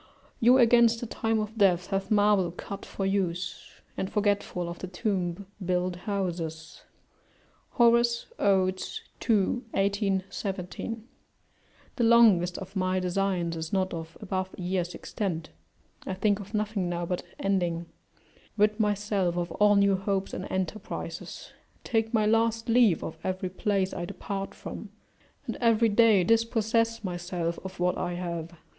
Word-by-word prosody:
["You 245 +3 +6
against 235 -1 +5
the 240 - -4
time 225 0 -1
of 215 +1 -4
death 185 -2 +3
have 195 0 -1
marble 205 -3 +4
cut 195 +3 -7
for 195 - -3
use, 180 -3 -2 0.3
and, 190 - -2
forgetful 205 -4 0
of 170 0 -6
the 185 - -5
tomb, 185 -1 -2 0.2
build 180 0 0
houses." 175 -4 -4 0.9
Horace, 235 0 +4
Od., 190 -2 +2 0.5
ii. 215 +2 +3 0.2
18, 195 -1 +1
17.] 195 +4 -5 0.9
The 240 - +1
longest 215 -7 +5
of 190 +1 -9
my 185 0 +1
designs 180 -2 0
is 160 0 -5
not 190 -1 0
of 165 0 -7
above 185 -2 -2
a - - -7
year's 180 -1 -1
extent; 170 - -4 0.6
I 190 - -2
think 205 +1 +1
of 205 +2 -7
nothing 210 -3 -1
now 175 0 -2
but 180 +1 -2 0.2
ending; 175 -4 0 0.7
rid 210 +1 +3
myself 205 -4 0
of 175 -1 -2
all 205 +3 +4
new 200 -1 +4
hopes 195 0 -2
and 185 - -5
enterprises; 190 +2 -5 0.3
take 225 -1 0
my 220 -2 +2
last 225 +1 +2
leave 230 -7 +4
of 160 0 -6
every 185 0 -2
place 195 -1 0
I 175 - -3
depart 195 +2 -5
from, - - -8 0.6
and - - -4
every 230 -1 +3
day 215 -3 +5
dispossess 230 +1 +1
myself 175 -2 -3
of 190 -1 -8
what 180 0 +1
I 175 - -2
have. 170 -1 -5
195 Hz, 145 wpm, -28 LUFS, 180-215 Hz, 0.9 s, You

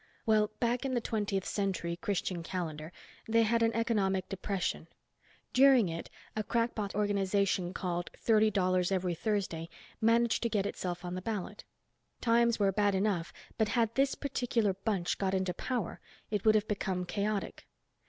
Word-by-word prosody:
Well, 215 -1 +3
back 240 +1 +1
in 265 -2 -1
the - - +3
Twentieth 205 -4 -1
Century, 190 -4 -1
Christian 185 -2 -2
calendar, 165 -3 -4 0.4
they 230 +1 +4
had 230 +1 +2
an 225 0 +4
economic 195 -5 +1
depression. 190 -3 -2 0.7
During 260 -6 +6
it 165 0 -5 0.3
a 215 - 0
crackpot 230 -3 -1
organization 200 -3 +1
called 175 -2 -3
Thirty 220 -1 +4
Dollars 185 -2 +1
Every 185 -2 0
Thursday 170 -4 -2 0.3
managed 230 +1 +3
to 235 - 0
get 205 -3 0
itself 180 -3 -4
on 175 - -4
the 185 - -4
ballot. 205 -2 -4 0.5
Times 235 0 +3
were 200 -2 +3
bad 205 0 +2
enough 190 -4 0 0.3
but 220 -1 +2
had 230 -1 +2
this 270 +2 +2
particular 240 -7 0
bunch 195 -2 -1
got 195 -1 +1
into 185 -1 0
power 235 0 -3 0.3
it 210 -1 -1
would 215 0 +6
have 215 0 +2
become 190 -3 -2
chaotic. 205 +2 -3
205 Hz, 155 wpm, -31 LUFS, 185-225 Hz, 0.7 s, During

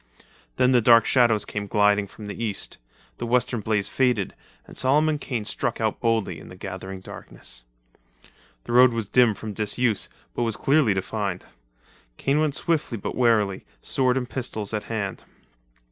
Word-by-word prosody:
Then 125 - +3
the 125 -2 +5
dark 115 0 +6
shadows 120 -5 +3
came 105 -1 -4
gliding 105 0 +3
from 105 +2 -11
the 105 +3 -5
east, 105 -4 -4 0.4
the - - -3
western 120 0 +1
blaze 105 -1 0
faded, 125 -7 +1 0.3
and - - -13
Solomon 150 +3 +2
Kane 120 -6 -3
struck 115 +2 -1
out, 110 -2 -1
boldly 115 -3 0
in - - -12
the - - -11
gathering 95 0 -7
darkness. - - -10 1.0
The - - -7
road 125 0 +6
was 115 -3 -2
dim 120 -1 +4
from 110 0 -6
disuse 110 +1 0 0.2
but - - -3
was 115 -3 0
clearly 135 -8 +3
defined. 95 -1 -3 0.7
Kane 140 +2 +1
went 155 -2 +1
swiftly 150 -8 -1
but 100 - -4
warily, 110 -6 +2 0.2
sword 130 - +1
and 125 -2 -2
pistols 110 -5 -3
at 105 -1 -2
hand. 105 -4 -4
115 Hz, 160 wpm, -24 LUFS, 105-125 Hz, 1.0 s, dark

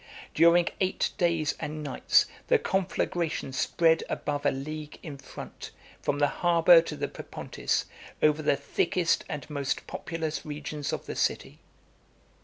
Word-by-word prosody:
During 170 +1 +5
eight 190 0 0
days 165 -3 +2
and 150 0 -4
nights, 145 - +3 0.2
the 480 - +5
conflagration 175 - -1
spread 160 +4 +2
above 145 -1 -1
a - - +4
league 150 +2 -6
in 145 -4 -7
front, 135 - -9 0.3
from - - 0
the 145 - +4 0.2
harbor 170 -1 +7
to 160 -2 -6
the 145 0 -2
Propontis, - - -3 0.3
over 155 0 +3
the 145 - +3
thickest 165 +4 +1
and 145 -2 -5
most 140 -3 -2
populous 160 -1 -4
regions 150 -1 -4
of - - -4
the - - -5
city. - - -1
155 Hz, 140 wpm, -28 LUFS, 145-170 Hz, 0.3 s, harbor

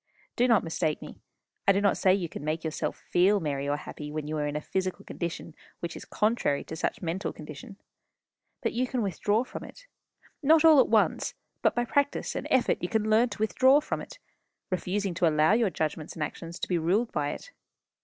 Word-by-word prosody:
Do 245 - +3
not 230 -4 +4
mistake 160 -2 -1
me. - - -10 0.5
I - - +8
do 195 - +2
not 200 -1 +3
say 185 - +3
you 185 -4 -2
can 150 - -8
make 155 +2 -2
yourself 155 -2 -3
feel 195 +4 +3
merry 140 -4 -2
or 145 - +1
happy 150 0 -8
when 155 -1 -4
you 155 - -3
are 150 -1 0
in 145 - -4
a - - 0
physical 185 +3 -3
condition 170 -1 -5 0.3
which 170 -1 -5
is - - -9
contrary 210 -10 0
to 160 - -7
such 160 - -2
mental 175 +3 -2
condition. 155 +5 -10 0.9
But - - 0
you 250 +2 0
can 250 -2 -1
withdraw 205 +4 +1
from - - -8
it - - -12 0.6
not 315 +2 +5
all 315 -3 +8
at - - +5
once; - - +2 0.3
but - - +2
by 240 0 +1
practice 285 +2 0
and - - -3
effort 260 -2 +2
you 175 - -2
can 220 -1 0
learn 230 +3 +4
to 205 - -7
withdraw 260 +6 +5
from 300 - -3
it, - - -10 0.5
refusing 185 +1 -1
to 170 0 +2
allow 155 +4 +4
your 225 -2 +3
judgments 155 -2 -3
and 155 - -2
actions 165 +3 -6
to - - -4
be 175 -2 +1
ruled 195 +9 +1
by 145 -1 -1
it. - - -7
185 Hz, 215 wpm, -28 LUFS, 155-230 Hz, 0.9 s, I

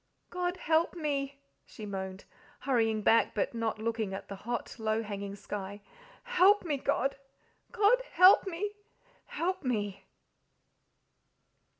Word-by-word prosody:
"God 360 0 -2
help 325 +2 +1
me!" 280 -4 -2 0.3
she 215 - -10
moaned, 190 -1 -6 0.4
hurrying 225 -5 +1
back, 230 +2 +4
but - - 0
not 230 -2 -2
looking 220 -3 -2
at - - -8
the 200 - -5
hot, 235 +4 -5
low 220 0 0
hanging 200 -1 -5
sky. 200 0 -6 0.4
"Help 415 -5 +4
me, 300 -4 0
God! 275 +1 0 0.5
God, 465 +2 +4
help 370 +2 +7
me, 385 +3 -3 0.6
help 365 +1 -2
me!" 205 -6 -2
240 Hz, 120 wpm, -30 LUFS, 205-345 Hz, 0.6 s, help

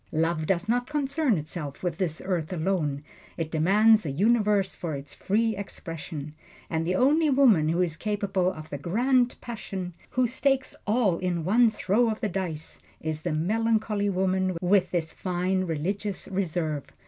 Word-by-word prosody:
Love 160 0 0
does 190 +1 0
not 245 +3 0
concern 285 - +1
itself 150 -1 -6
with 175 -3 -2
this 165 -5 -1
earth 175 -4 -1
alone 160 -5 -1 0.3
it 160 -1 -3
demands 210 +7 +4
a 155 - -3
universe 205 - +2
for 160 -4 -4
its 140 +1 -7
free 220 +2 0
expression. 165 -6 -7 0.4
And 165 0 -1
the 180 - +1
only 300 - +4
woman 235 - +5
who 170 +3 +2
is 165 -2 -2
capable 195 -2 0
of 155 -4 -10
the 145 - -4
Grand 245 - +2
Passion 195 -6 -6 0.2
who 255 - +4
stakes 265 +2 0
all 205 -6 +2
on 175 -3 -1
one 230 +5 +5
throw 215 +2 +1
of 220 - -2
the 215 - -1
dice 170 -4 -4 0.2
is 155 -1 -3
the 175 - -2
melancholy 215 +4 +1
woman, 185 -1 0
with 185 +1 +3
this 165 -2 -2
fine, 185 +1 -1
religious 190 +5 -3
reserve. 165 -6 -2
185 Hz, 160 wpm, -27 LUFS, 165-220 Hz, 0.4 s, woman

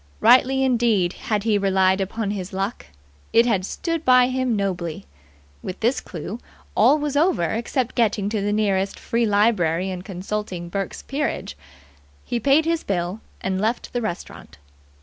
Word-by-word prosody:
Rightly 265 +1 +5
indeed 230 -8 +2
had 210 -2 -2
he 215 -2 +2
relied 190 -1 +2
upon 205 +2 -2
his 195 -2 -5
luck. 195 +4 -3 0.5
It 230 +1 +6
had 205 -6 +1
stood 330 - -3
by 250 -2 +5
him 255 -2 0
nobly. 180 -5 -3 0.6
With 185 - -6
this 240 +4 +2
clue, 185 +6 -7 0.3
all 255 +8 +5
was 295 -1 -3
over 320 - +2
except 235 +2 -1
getting 215 -4 +1
to 215 -1 -1
the 205 +1 0
nearest 200 -2 0
Free 230 0 0
Library 190 -4 +2
and 180 -1 -6
consulting 190 -2 -5
Burke's 195 +1 -4
Peerage. 285 +2 -3 0.7
He 240 - -2
paid 280 +6 +3
his 330 0 0
bill 180 +2 -2 0.2
and 190 0 -1
left 225 +3 -2
the 245 - -1
restaurant. 175 - -6
210 Hz, 155 wpm, -23 LUFS, 190-245 Hz, 0.7 s, It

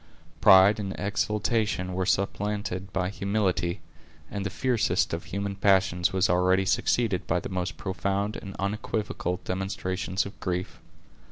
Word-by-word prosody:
Pride 95 +3 +7
and 100 -2 -4
exultation 105 -1 0
were 95 0 -1
supplanted 100 -1 -1
by 90 -1 -1
humility, 100 -3 -1 0.5
and 100 -1 -3
the 100 - -2
fiercest 120 +1 +1
of 85 - -3
human 100 +1 -3
passions 95 -3 +3
was 95 -1 +2
already 90 +2 +3
succeeded 105 -1 +1
by 90 - +1
the - - -6
most 90 -3 -3
profound 100 +4 -2
and 100 -2 -8
unequivocal 100 -2 -2
demonstrations 95 0 -2
of 100 - -10
grief. 90 0 -3
95 Hz, 135 wpm, -27 LUFS, 90-100 Hz, 0.5 s, Pride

